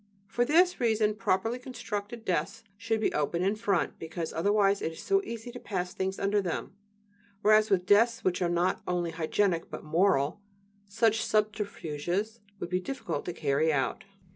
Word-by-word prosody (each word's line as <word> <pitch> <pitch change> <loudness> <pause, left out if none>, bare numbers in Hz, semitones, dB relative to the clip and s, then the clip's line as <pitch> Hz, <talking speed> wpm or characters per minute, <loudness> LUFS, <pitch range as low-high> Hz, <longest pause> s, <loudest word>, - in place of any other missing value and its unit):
For 240 +4 0
this 355 +6 +4
reason 220 -3 +2
properly 225 +2 0
constructed 230 -3 -6
desks 185 +6 -1
should 225 +2 -1
be 215 - 0
open 170 +4 0
in 195 +3 +1
front, 205 -4 0
because 165 0 -5
otherwise 200 +3 +2
it 160 - -2
is - - -11
so 390 0 +3
easy 235 - -6
to 245 - -8
pass 180 -5 -3
things 190 0 -2
under 200 +1 +1
them; 180 +1 -4 0.7
whereas 215 +1 +5
with 180 -2 +2
desks 230 +4 +4
which 185 0 0
are 175 - +2
not 175 +1 +1
only 175 -2 -1
hygienic 165 +2 0
but - - -7
"moral," 160 0 +2 0.5
such 225 +2 +2
subterfuges 210 -1 -1 0.2
would 175 - -5
be 180 - +2
difficult 270 +8 -4
to 175 - -3
carry 155 +1 +1
out. 135 +4 -1
200 Hz, 165 wpm, -29 LUFS, 175-225 Hz, 0.7 s, whereas